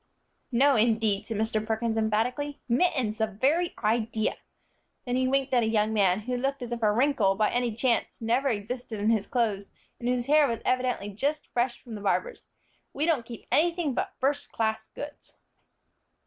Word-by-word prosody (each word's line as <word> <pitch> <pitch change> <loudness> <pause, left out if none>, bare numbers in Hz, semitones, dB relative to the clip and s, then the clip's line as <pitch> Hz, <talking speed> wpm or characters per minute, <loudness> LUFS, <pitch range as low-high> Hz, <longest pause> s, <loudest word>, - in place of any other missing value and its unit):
"No, 270 +3 +4
indeed," 220 -3 +2
said 225 - -3
Mr. 220 0 0
Perkins, 220 +1 -1
emphatically. 230 +7 -1
"Mittens, 250 -5 +1
the 220 - +2
very 280 - 0
idea!" 220 0 0 0.7
then 245 -1 -1
he 260 0 +2
winked 270 0 0
at 245 - +5
a 220 - +1
young 220 -1 +1
man, 195 -2 +3
who 250 +3 -3
looked 275 +1 -2
as 240 - -7
if 240 -1 -3
a 215 -1 +4
wrinkle, 230 -4 +2
by 215 +1 +2
any 240 -2 0
chance, 235 0 0
never 235 +5 +1
existed 225 0 -4
in 210 +2 +2
his 220 -3 +1
clothes, 215 -5 -1 0.3
and 240 - -2
whose 250 -1 0
hair 295 +1 +5
was 230 -2 -2
evidently 250 -5 0
just 285 +9 -2
fresh 240 0 0
from 235 - -9
the 210 - -6
barber's. - - -1 0.5
"We 290 - 0
don't 295 -9 +1
keep 235 -2 -9
anything 335 -3 +2
but - - -3
first 280 +2 -1
class 220 -1 -1
goods." 290 0 -9
235 Hz, 180 wpm, -27 LUFS, 220-265 Hz, 0.7 s, at